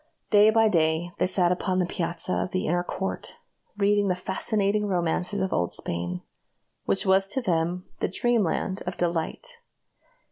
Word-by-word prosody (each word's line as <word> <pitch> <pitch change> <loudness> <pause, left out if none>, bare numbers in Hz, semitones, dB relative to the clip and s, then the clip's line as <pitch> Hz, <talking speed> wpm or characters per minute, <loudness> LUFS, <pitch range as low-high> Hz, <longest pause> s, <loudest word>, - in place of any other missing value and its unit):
Day 210 0 +7
by 225 0 +4
day 165 -2 +1
they - - +2
sat 180 -2 +2
upon 185 +1 0
the 180 - +2
piazza 170 +1 -2
of - - -1
the 185 +1 -2
inner 175 +2 +1
court, 190 +2 -4 0.4
reading 205 0 +3
the 180 - +1
fascinating 200 +2 0
romances 180 +2 0
of 190 - -1
old 85 0 0
Spain, 85 +1 -3 0.6
which 195 - +1
was 190 0 +4
to 235 - -2
them 175 -4 -1
the - - 0
dreamland 205 -5 0
of 180 - -3
delight. 175 - -2
185 Hz, 155 wpm, -26 LUFS, 175-205 Hz, 0.6 s, Day